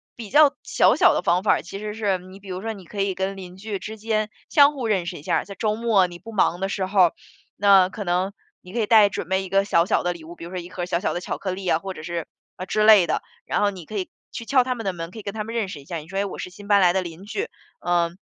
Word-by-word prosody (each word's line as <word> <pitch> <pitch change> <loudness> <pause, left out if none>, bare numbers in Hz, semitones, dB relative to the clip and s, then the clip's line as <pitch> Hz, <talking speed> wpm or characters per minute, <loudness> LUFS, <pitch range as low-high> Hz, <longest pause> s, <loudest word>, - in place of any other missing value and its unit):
比 225 -4 -8
较 295 +2 +6
小 - - +3
小 - - +5
的 - - +1
方 175 +2 +2
法， 210 - +3
其 195 - -8
实 210 0 -5
是 205 -4 0
你 185 +2 -13
比 200 - -15
如 185 0 -4
说 225 +1 -3
你 195 -4 -12
可 200 +2 -4
以 195 -1 0
跟 190 +1 -2
邻 185 -1 -10
居 205 0 -5
之 220 +3 -7
间 215 0 -1 0.2
相 285 0 +6
互 260 -5 -4
认 195 -5 +1
识 175 -1 -4
一 145 - -12
下。 - - +1
在 200 - -10
周 215 +2 0
末 220 -4 +3
你 175 -1 -11
不 225 - -10
忙 185 -4 +2
的 195 +1 -1
时 195 -1 -1
候， 185 -4 +4 0.5
那 195 -2 +6
可 205 +1 -6
能 185 +2 0 0.3
你 180 - -13
可 240 - -1
以 215 - +1
带 215 -2 +7
准 180 -3 -5
备 190 0 +1
一 190 - -8
个 195 +1 +3
小 170 -4 +3
小 - - +2
的 175 - +1
礼 170 -2 -12
物， 170 +2 -10
比 - - -11
如 - - -8
说 185 - -4
1 175 0 -9
盒 175 -1 -4
小 170 -1 0
小 190 - -1
的 175 - -3
巧 - - -4
克 190 - -3
力 185 0 -5
啊， 160 - +3
或 190 +2 -6
者 155 - -9
是 170 -1 -4 0.3
啊， 185 - -5
之 215 +3 +1
类 210 -5 +8
的， - - 0 0.2
然 - - 0
后 205 - +4
你 180 -5 -10
可 215 - -9
以 185 - -3 0.2
去 235 - -6
敲 260 +1 +4
他 255 0 -1
们 230 - -6
的 195 - +1
门， 165 -1 -6
可 220 - -9
以 - - -7
跟 200 - -5
他 215 - -2
们 225 +2 -7
认 220 -5 -1
识 150 - -7
一 140 - -18
下。 170 - -4
你 155 -1 -9
说， 190 +3 -6
诶， 200 - +1
我 195 - -6
是 - - -5
新 200 +3 -13
搬 205 -1 +5
来 180 -1 +6
的 190 - +1
邻 175 +1 -9
居， 405 - -3 0.4
嗯， 175 0 +1
195 Hz, 335 characters per minute, -23 LUFS, 180-215 Hz, 0.5 s, 类